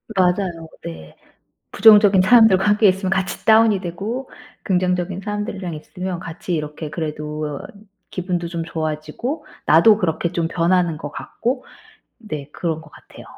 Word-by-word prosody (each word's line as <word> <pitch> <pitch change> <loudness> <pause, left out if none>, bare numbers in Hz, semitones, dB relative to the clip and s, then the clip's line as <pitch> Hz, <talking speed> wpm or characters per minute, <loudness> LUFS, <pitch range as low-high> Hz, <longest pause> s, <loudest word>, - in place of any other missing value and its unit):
맞아요. 180 -3 0 0.2
네. 80 -2 -9 0.6
부정적인 205 -3 +6
사람들과 195 -2 +6
함께 210 0 +4
있으면 190 0 +1
같이 190 0 -2
다운이 220 -2 +5
되고 205 +9 -5 0.3
긍정적인 180 0 0
사람들이랑 200 -4 -4
있으면 180 +3 -6
같이 175 +3 -6
이렇게 150 0 -5
그래도 150 -1 -4 0.5
기분도 175 -2 -3
좀 170 -1 -4
좋아지고 160 - -4 0.2
나도 200 +7 +6
그렇게 170 -2 -1
좀 170 -2 -1
변하는 170 -1 +1
것 145 -2 -7
같고 250 +2 -3 0.6
네 150 - -7
그런 160 -2 -3
것 160 - -16
같아요. - - -15
180 Hz, 320 characters per minute, -20 LUFS, 160-205 Hz, 0.6 s, 부정적인